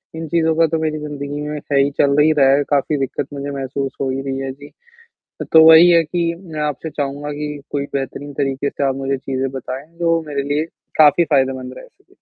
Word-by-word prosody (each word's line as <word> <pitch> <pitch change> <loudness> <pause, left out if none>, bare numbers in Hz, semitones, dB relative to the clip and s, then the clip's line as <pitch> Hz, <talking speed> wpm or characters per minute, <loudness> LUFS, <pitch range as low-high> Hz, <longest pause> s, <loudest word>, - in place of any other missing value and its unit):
इन 160 0 -5
चीज़ 165 +1 +1
का 165 - +5
तो 160 +1 -1
मेरी 155 -1 -1
ज़िंदगी 145 -1 -5
में 150 0 -4
सही 140 -1 +1
चल 140 - +4
नहीं 155 +1 +5
रहा 135 -1 +5
है, 145 +1 +2
काफ़ी 145 +1 +1
दिक्कत 135 0 -3
मुझे 140 0 -5
महसूस 135 0 -4
हो 135 - 0
ही 130 +1 -2
रही 135 -1 -4
है, 135 0 -4
जी। 145 +2 -13 0.8
तो 160 0 +8
वही 160 +2 +9
है 170 -1 +5
कि 170 +1 -1
मैं 165 -5 -8
आपसे 150 +2 -3
चाहूँगा 145 0 -4
कि 150 0 -5
कोई 140 -1 -2
बेहतरीन 140 +1 -4
तरीके 140 0 -1
से - - -4
आप 135 - -1
मुझे 135 0 -2
चीज़ें 135 0 -3
बताएँ, 135 +1 -6
जो 165 -1 +2
मेरे 140 -2 -2
लिए 155 +2 0 0.3
काफ़ी 155 +2 +6
फ़ायदेमंद 130 -2 0
रह - - -11
सके? - - -32
145 Hz, 215 wpm, -19 LUFS, 135-155 Hz, 0.8 s, वही